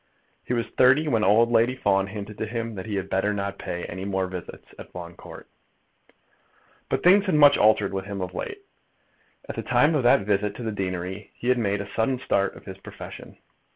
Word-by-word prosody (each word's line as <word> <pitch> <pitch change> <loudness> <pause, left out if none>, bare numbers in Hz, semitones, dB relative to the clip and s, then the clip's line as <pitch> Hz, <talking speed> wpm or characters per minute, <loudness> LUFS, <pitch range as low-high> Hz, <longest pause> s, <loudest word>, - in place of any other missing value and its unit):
He 125 - -2
was 115 - -1
thirty 135 +5 +3
when 115 -6 +1
old 115 +4 +4
Lady 120 +2 +3
Fawn 100 -5 +1
hinted 105 +1 -8
to 110 - -2
him 115 0 -4
that 95 0 -7
he 105 - -3
had 95 -1 -2
better 100 +2 0
not 100 0 -4
pay 90 0 -5
any 95 +2 -6
more 95 -1 -1
visits 90 -2 -9
at - - -11
Fawn 85 -1 -8
Court. - - -12 1.4
But - - -1
things 195 +3 +5
had 185 - +2
much 145 -1 +7
altered 105 -2 +3
with 95 0 -3
him 100 -1 -5
of 90 -1 -4
late. 400 - -6 0.8
At - - -6
the - - -3
time 150 +3 +3
of 150 - +2
that 125 0 +5
visit 105 0 0
to 120 - -7
the 110 - -2
deanery 95 0 -4
he 120 - -3
had 125 -1 +3
made 100 -2 0
a 100 0 -8
sudden 120 +3 +1
start 100 -6 0
in - - -13
his 95 -1 -9
profession. - - -10
105 Hz, 215 wpm, -25 LUFS, 95-120 Hz, 1.4 s, much